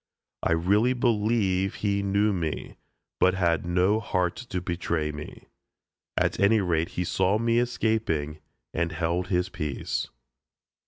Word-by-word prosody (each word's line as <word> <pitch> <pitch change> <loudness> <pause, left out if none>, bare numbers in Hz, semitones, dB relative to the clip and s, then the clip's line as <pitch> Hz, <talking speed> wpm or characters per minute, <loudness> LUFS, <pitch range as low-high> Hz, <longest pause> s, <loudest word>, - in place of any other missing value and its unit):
I 85 - +2
really 100 +9 +3
believe 105 -5 +1
he 100 -1 0
knew 100 +1 +2
me, 80 -4 -3 0.4
but 95 0 +4
had 85 -3 +1
no 90 +5 +3
heart 90 -5 0
to 115 -7 -4
betray 85 -3 -2
me. 75 0 -9 0.7
At - - +1
any 105 +3 +5
rate 85 -3 0
he 90 - +1
saw 95 +3 +1
me 115 +1 +2
escaping 110 -11 0 0.3
and 85 0 -1
held 85 +3 -1
his 90 -1 0
peace. 75 -5 -3
95 Hz, 130 wpm, -26 LUFS, 85-105 Hz, 0.7 s, any